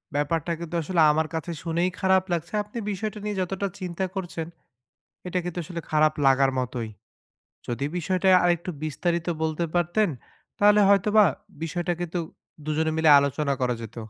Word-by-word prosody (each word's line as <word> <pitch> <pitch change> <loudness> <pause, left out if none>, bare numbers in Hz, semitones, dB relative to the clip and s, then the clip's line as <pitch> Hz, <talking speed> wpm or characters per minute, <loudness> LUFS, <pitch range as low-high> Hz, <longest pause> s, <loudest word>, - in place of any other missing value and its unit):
ব্যাপারটা 160 +3 0
কিন্তু 170 0 -6
আসলে 170 +1 +1
আমার 155 +1 0
কাছে 160 +2 -3
শুনেই 170 +2 0
খারাপ 190 0 +3
লাগছে, 170 +4 -3
আপনি 210 +3 -10
বিষয়টা 210 +2 -4
নিয়ে 210 -1 -2
যতটা 195 +2 -2
চিন্তা 185 +1 -3
করছেন, 170 -3 -4 0.8
এটা 180 - -2
কিন্তু 175 0 -5
আসলে 170 +1 -6
খারাপ 155 0 +4
লাগার 135 0 +4
মতোই। 120 -3 -3 0.8
যদি 125 +3 -2
বিষয়টা 185 +2 0 0.2
আরেকটু 175 0 +1
বিস্তারিত 170 +2 -1 0.2
বলতে 160 +2 -1
পারতেন 175 +4 +2 0.5
তাহলে 210 +1 +6
হয়তো 200 +1 +4
বা 210 - +8 0.4
বিষয়টা 175 +2 -2
কিন্তু 175 0 -3 0.5
দুজনে 160 +1 0
মিলে 160 -1 +4
আলোচনা 140 0 0
করা 125 -1 +1
যেত। 115 +1 -9
170 Hz, 155 wpm, -25 LUFS, 155-185 Hz, 0.8 s, বা